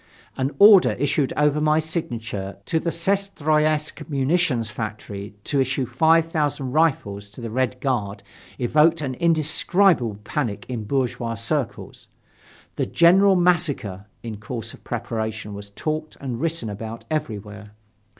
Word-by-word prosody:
An 130 0 0
order 200 -2 +8
issued 140 0 0
over 150 0 +2
my 155 0 +3
signature 115 - -4
to 160 - 0
the 170 - -2
Syestroyetsk 155 -5 0
munitions 135 -5 +1
factory 105 -2 -6
to 140 - 0
issue 130 0 0
five 160 +7 +3
thousand 145 -5 -2
rifles 115 -10 0
to 105 - -14
the 115 -2 -6
Red 130 +1 -1
Guard 110 -7 -2 0.3
evoked 155 +6 +3
an 135 -3 -2
indescribable 160 - +2
panic 105 -4 -3
in 120 -4 -4
bourgeois 120 -2 -1
circles. 120 +2 -4 0.7
"The - - 0
general 190 +3 +5
massacre" 155 - +1 0.2
in 115 -3 -6
course 115 +1 -6
of - - -15
preparation 110 -2 -4
was 100 0 -9
talked 155 +8 -4
and 125 -3 -5
written 165 -7 -2
about 110 +2 -7
everywhere. 105 -8 -5
135 Hz, 130 wpm, -23 LUFS, 110-155 Hz, 0.7 s, order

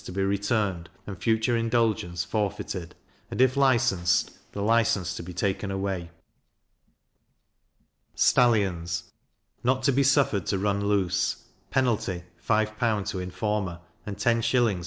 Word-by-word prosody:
to - - -7
be 95 +2 -1
returned, 100 -3 0 0.2
and 95 -3 -8
future 115 +1 +2
indulgence 115 -7 0
forfeited; 100 -4 -3 0.3
and, - - -6
if 130 0 +4
licensed, 120 -11 +2 0.2
the - - -7
license 105 -5 +2
to - - -5
be 90 +1 -8
taken 95 +3 -2
away. 95 -3 -3 2.1
Stallions 90 -8 +2 0.6
not 130 +1 +1
to 140 - +4
be 135 +1 +2
suffered 135 - +2
to 100 - +1
run 100 +1 0
loose; 100 -4 0 0.3
penalty, 110 -9 0 0.2
5L. 110 -1 0
to 95 - -3
informer, 90 0 -2 0.3
and 100 -1 -5
10s. 115 -3 +2
105 Hz, 120 wpm, -26 LUFS, 95-115 Hz, 2.1 s, if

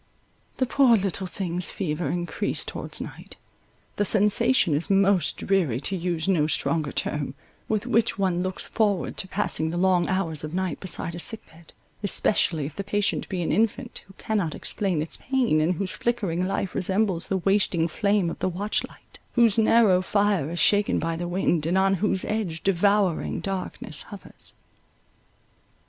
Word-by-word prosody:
The 260 - +1
poor 250 -2 +4
little 195 -1 -2
thing's 180 -2 -3
fever 160 -4 -3
encreased 175 +1 -1
towards - - -5
night. - - -9 0.6
The 205 - +2
sensation 205 - +3
is 150 +7 -1
most 195 -4 +3
dreary, 170 - 0
to 195 - -1
use 175 -1 -2
no 165 -6 +2
stronger 155 -1 +2
term, 145 -2 -2 0.3
with 215 0 -1
which 230 -2 +1
one 185 -3 0
looks 185 0 -4
forward 205 -5 0
to 190 - -1
passing 185 -5 0
the 170 - -3
long 180 -1 +2
hours 170 -6 -1
of 155 +2 -5
night 185 -1 -2
beside 170 -2 -4
a 170 - -6
sick 225 +5 -1
bed, 165 0 -17 0.3
especially 185 -6 +2
if 150 - -7
the 200 - -4
patient 205 +1 -1
be 180 -3 -2
an - - -1
infant, 230 +3 -1
who 195 - -17
cannot 200 -8 -2
explain 185 -7 -1
its 160 - -1
pain, 245 - +1
and 170 +4 +1
whose 185 +2 -2
flickering 190 -7 -1
life 195 -1 -2
resembles 190 -1 +1
the 195 - 0
wasting 190 -3 +2
flame 200 0 0
of - - -8
the - - 0
watch 200 +4 -1
light, - - -19
Whose 230 -3 +4
narrow 215 -4 +4
fire 200 -5 +1
Is 170 +1 -4
shaken 205 0 +3
by 165 0 -2
the 175 +1 -4
wind, 175 -3 0
and 175 +3 +1
on 195 0 +3
whose 195 -3 0
edge 185 -7 -3
Devouring 195 -1 +1
darkness 195 -1 -4
hovers. - - -12
190 Hz, 170 wpm, -25 LUFS, 170-205 Hz, 0.6 s, poor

